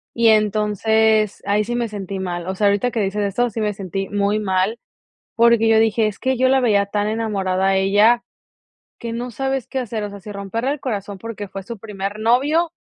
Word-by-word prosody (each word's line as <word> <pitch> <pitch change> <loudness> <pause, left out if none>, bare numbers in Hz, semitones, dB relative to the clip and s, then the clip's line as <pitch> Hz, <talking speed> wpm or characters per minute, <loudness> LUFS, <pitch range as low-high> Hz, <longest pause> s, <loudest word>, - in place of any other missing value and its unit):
Y 235 -1 +4
entonces 215 0 +2
ahí 205 +1 +2
sí 240 +3 -3
me 240 -1 -1
sentí 200 -2 -6
mal. 175 -2 -4
O 190 - -2
sea, 205 +1 +2
ahorita 200 +4 +2
que 230 - -2
dices 205 +1 -1
eso, 205 +5 0
sí 220 +1 -4
me 210 -1 0
sentí 195 0 -5
muy 205 +1 0
mal 195 +3 0 0.6
porque 230 -1 +4
yo 220 0 +5
dije: 220 0 +2
"Es 205 - -7
que 260 -1 0
yo 260 +1 +3
la 265 0 +4
veía 205 -5 +2
tan 205 0 -1
enamorada 195 -4 0
a 195 - +3
ella 205 +5 +4 0.8
que 230 -1 -5
no 245 +2 -4
sabes 270 +1 -2
qué 265 - -3
hacer". 220 -3 -4
O 205 - -4
sea, 200 0 -10
si 210 +2 -10
romperle 205 +6 -3
el 290 - -2
corazón 205 -5 -4
porque 215 -2 -7
fue 195 0 -8
su 230 +1 -7
primer 205 0 -5
novio 285 +9 +2
215 Hz, 215 wpm, -20 LUFS, 200-235 Hz, 0.8 s, yo